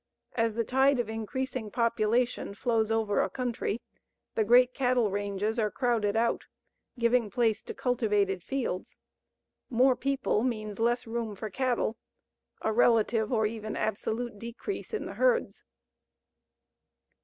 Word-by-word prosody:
As 230 -2 0
the 230 - +1
tide 265 +3 +3
of 235 -3 -1
increasing 225 +1 -3
population 230 0 0
flows 225 -1 +1
over 220 -2 +2
a - - 0
country, 245 -3 -2 0.5
the 220 - +2
great 245 +3 +5
cattle 245 -5 +2
ranges 205 +3 -1
are 215 -1 +2
crowded 225 -4 0
out, 230 +1 +1 0.5
giving 235 -1 +2
place 225 0 +1
to - - -8
cultivated 210 -6 +1
fields. 250 -5 -3 0.7
More 255 +2 +4
people 270 -5 0
means 215 -4 -2
less 240 +2 +1
room 225 -2 -3
for 215 +2 -6
cattle 245 -2 0 0.7
a 220 - +1
relative 225 -1 +3
or 220 -3 +2
even 215 0 -4
absolute 220 +1 -2
decrease 235 - -6
in 435 - -3
the - - -6
herds. - - +1
230 Hz, 130 wpm, -29 LUFS, 215-245 Hz, 0.7 s, great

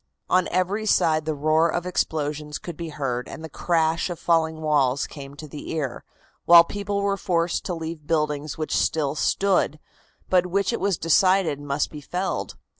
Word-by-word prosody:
On 185 0 +3
every 190 +5 -1
side 155 -5 +3
the 155 -1 -1
roar 155 +3 +2
of 175 +2 -2
explosions 150 -4 -2
could 175 - -8
be 165 +1 -6
heard, 130 -5 -3
and 160 - -9
the 160 - -7
crash 165 +2 0
of 175 - -4
falling 160 -1 +1
walls 140 -3 +2
came 140 -1 -10
to 155 +1 -9
the 145 0 -9
ear, 140 -6 -3 0.4
while 170 0 +9
people 200 +2 -3
were 200 0 +1
forced 170 -2 0
to 180 - -2
leave 160 -2 -6
buildings 150 -2 -1
which 155 -1 -2
still 150 -3 +1
stood, 180 -1 +1 0.5
but 180 -1 +3
which 200 +4 0
it - - -2
was 195 -3 0
decided 180 -1 +3
must 145 0 -1
be 150 - -8
felled. 180 +6 -3
160 Hz, 180 wpm, -24 LUFS, 150-180 Hz, 0.5 s, while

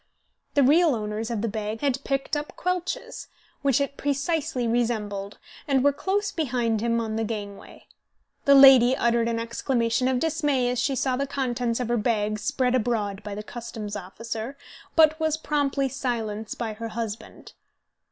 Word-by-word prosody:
The 285 - +5
real 305 +2 +5
owners 215 +1 -3
of 230 -3 -2
the - - +1
bag 215 0 -4
had 280 -1 0
picked 275 +2 -1
up 295 0 -4
Quelch's 365 +6 -3 0.3
which 275 -2 +2
it 280 0 -2
precisely 285 -2 -1
resembled, 215 -4 -1 0.3
and 270 -3 +2
were 285 0 +4
close 395 +6 -1
behind 240 - 0
him 230 0 +1
on 220 -1 -3
the 225 - 0
gangway. 205 -2 -7 0.6
The 280 - +7
lady 265 -2 +8
uttered 235 -1 +2
an 230 -1 -1
exclamation 230 +1 0
of 260 -1 +1
dismay 295 -4 +1
as 250 - -2
she 270 +2 +1
saw 255 0 0
the 280 +1 -1
contents 245 -3 -1
of 250 - -2
her 240 0 +1
bag 215 -2 0
spread 250 +3 0
abroad 220 -5 0
by 205 -1 -6
the 210 - -6
customs 225 -2 -7
officer, 225 +7 -6 0.4
but 315 0 +5
was 315 -1 +1
promptly 285 -3 0
silenced 230 -5 -3
by 225 -2 -3
her 230 +2 -6
husband. 225 -1 -6
245 Hz, 165 wpm, -25 LUFS, 225-280 Hz, 0.6 s, lady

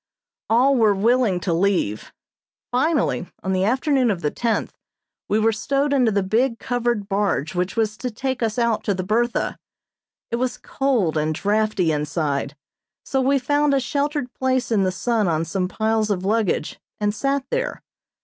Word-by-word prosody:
All 255 +5 +4
were 215 -3 +4
willing 225 -2 +2
to 170 0 0
leave. 170 - 0 0.6
Finally 265 - +1 0.2
on 190 - -1
the 185 0 +1
afternoon 260 +3 +2
of 190 -5 -1
the 150 - 0
tenth 230 -2 -1 0.6
we 210 - +2
were 220 +1 +3
stowed 275 +6 0
into 250 -5 +3
the 200 -1 +1
big 230 +5 +1
covered 240 -4 -1
barge 195 -6 0
which 180 +1 -2
was 220 -2 0
to 250 - -3
take 260 +3 -3
us 225 -1 -1
out 235 -2 +1
to 200 - +1
the 185 - -3
"Bertha." 230 +5 0 0.7
It 235 - 0
was 255 0 -1
cold 235 - 0
and 155 +1 0
draughty 205 -3 +1
inside, 150 -2 -2 0.5
so 265 -2 0
we 275 +2 +3
found 290 +2 +2
a - - +3
sheltered 285 0 -2
place 260 -2 0
in 215 -3 +3
the 185 - +1
sun 215 +3 0
on 165 -1 0
some 180 +2 -1
piles 220 +2 0
of 190 -2 -1
luggage, 210 -6 0 0.2
and 205 -1 0
sat 275 +4 -1
there. - - -2
220 Hz, 170 wpm, -22 LUFS, 190-255 Hz, 0.7 s, All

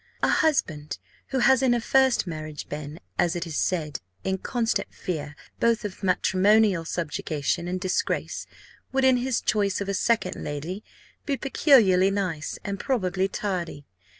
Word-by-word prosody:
A - - +4
husband 155 - +1 0.3
who 270 - -2
has 260 +1 +5
in 250 -2 +3
a - - +1
first 265 0 +3
marriage 155 -3 -6
been, 150 +2 -6 0.2
as 175 0 +2
it 175 - -2
is 165 -3 -6
said, 155 -5 -1 0.2
in 190 0 -1
constant 235 +1 -1
fear 150 -4 -5 0.2
both 230 -2 +2
of 195 -3 -6
matrimonial 190 0 +3
subjugation 160 0 -2
and 185 +1 -2
disgrace, 185 0 -2 0.4
would, 265 0 +1
in 260 -1 +5
his 250 0 0
choice 200 -3 +1
of 200 - -3
a 200 - -1
second 230 +4 0
lady, 160 +8 -5 0.4
be 280 -2 0
peculiarly 215 - +4
nice, 185 -7 -2
and 200 -1 -4
probably 190 -7 0
tardy. 180 -8 -4
190 Hz, 150 wpm, -26 LUFS, 165-235 Hz, 0.4 s, has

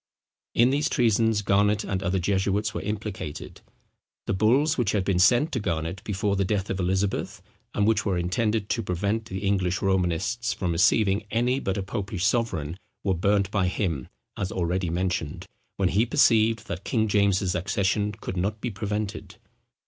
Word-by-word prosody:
In 120 +2 +5
these 145 +2 +1
treasons 115 -2 +2
Garnet 100 +1 +2
and 95 -1 -2
other 95 0 0
jesuits 100 +3 0
were - - -3
implicated. 105 -7 -5 0.6
The - - -1
bulls 125 +10 +3
which 115 -6 0
had 100 -3 0
been 95 -3 +1
sent 120 - +4
to 125 - -1
Garnet 85 -2 -3
before 100 0 -1
the 100 - +1
death 95 0 -1
of 95 - -3
Elizabeth, 95 +2 -1 0.4
and 100 - +2
which 110 0 +2
were 95 -4 0
intended 105 +4 0
to 115 - 0
prevent 100 +4 -1
the 95 -1 -5
English 95 -2 +1
Romanists 95 +6 0
from 90 -3 -2
receiving 100 +4 +2
any 120 +4 +1
but 95 -6 -2
a 100 - -2
popish 95 -2 -3
sovereign, 90 -10 0 0.3
were 95 - +1
burnt 100 +2 +1
by 100 -3 +1
him, 85 - -2 0.3
as 95 -2 -3
already 90 0 -1
mentioned, 85 -3 -2 0.3
when 95 -2 +2
he 110 +6 +2
perceived 115 -1 +3
that 90 +2 -5
King 110 -2 0
James's 100 -3 +2
accession 100 +3 0
could 100 -2 -6
not 100 +4 -1
be 120 +1 -3
prevented. 105 0 -4
100 Hz, 170 wpm, -26 LUFS, 95-110 Hz, 0.6 s, In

